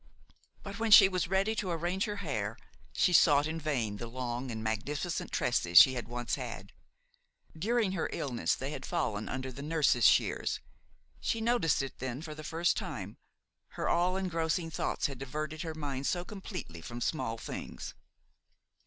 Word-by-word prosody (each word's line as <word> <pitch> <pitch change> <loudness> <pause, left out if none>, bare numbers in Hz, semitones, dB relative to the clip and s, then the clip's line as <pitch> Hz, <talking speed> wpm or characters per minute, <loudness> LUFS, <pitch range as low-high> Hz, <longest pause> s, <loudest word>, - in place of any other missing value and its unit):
But, 200 +1 -7
when 225 0 0
she 205 -2 +10
was 185 -3 -1
ready 195 +4 +1
to 190 - -1
arrange 175 +3 -1
her 210 - -3
hair, 110 -6 -2 0.3
she 180 - +2
sought 145 -3 +6
in 160 +1 -3
vain 125 -10 -1
the 120 - -6
long 125 +1 -4
and 110 -2 -4
magnificent 145 - -2
tresses 90 -8 +1
she 130 - +10
had 125 -3 -4
once 120 0 -4
had; - - -4 0.8
during 220 +4 +1
her 185 -4 -1
illness 130 -5 -1
they 135 +2 -4
had - - -6
fallen 110 - -2
under 130 0 -4
the 135 - -8
nurse's 150 -6 +3
shears. - - +2 0.6
She 225 - -1
noticed 220 - +2
it 135 - -7
then 130 +3 -4
for 155 -2 -6
the 155 0 -9
first 165 +2 +1
time, 130 - -5 0.6
her - - -1
all 180 +2 +2
engrossing 165 -2 -1
thoughts - - -1
had 135 -3 -3
diverted 150 +3 -4
her 160 -2 -4
mind 140 -3 -3
so 175 0 -1
completely 185 - -7
from 120 +8 -7
small 120 -3 -1
things. - - -7
150 Hz, 170 wpm, -31 LUFS, 125-175 Hz, 0.8 s, she